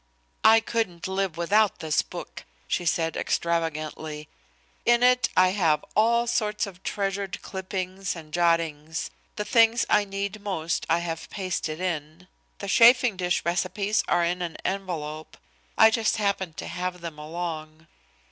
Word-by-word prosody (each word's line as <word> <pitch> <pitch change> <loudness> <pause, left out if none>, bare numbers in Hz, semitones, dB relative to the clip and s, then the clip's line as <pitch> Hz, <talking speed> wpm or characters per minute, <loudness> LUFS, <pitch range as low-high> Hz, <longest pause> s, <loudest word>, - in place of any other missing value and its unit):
"I 225 +1 +7
couldn't 220 -7 -2
live 190 -3 -2
without 205 +5 +3
this 155 -1 +1
book," - - -9 0.2
she 175 - -1
said 165 0 +1
extravagantly. 155 -2 -2 0.5
"In 240 0 +4
it 250 0 +4
I 185 0 +6
have 165 -6 +1
all 235 +2 +3
sorts 215 -3 0
of 190 -2 -11
treasured 195 -1 -3
clippings 190 0 -4
and 155 -2 -11
jottings. 165 -2 0 0.2
The 210 - -3
things 230 +2 +4
I 210 -1 +4
need 200 +1 -4
most 170 -5 -2
I 165 - +4
have 165 -1 -5
pasted 180 -5 -3
in. 170 -1 -4 0.3
The 200 - -6
chafing 235 +2 +6
dish 180 -1 -1
recipes 190 +4 0
are 175 - +2
in 175 +1 -1
an 170 -2 -4
envelope. 160 -5 -4 0.4
I 220 - +7
just 220 0 +1
happened 195 -5 -1
to - - -5
have 180 0 -4
them 165 -3 -7
along." 155 0 -6
180 Hz, 145 wpm, -26 LUFS, 165-205 Hz, 0.5 s, I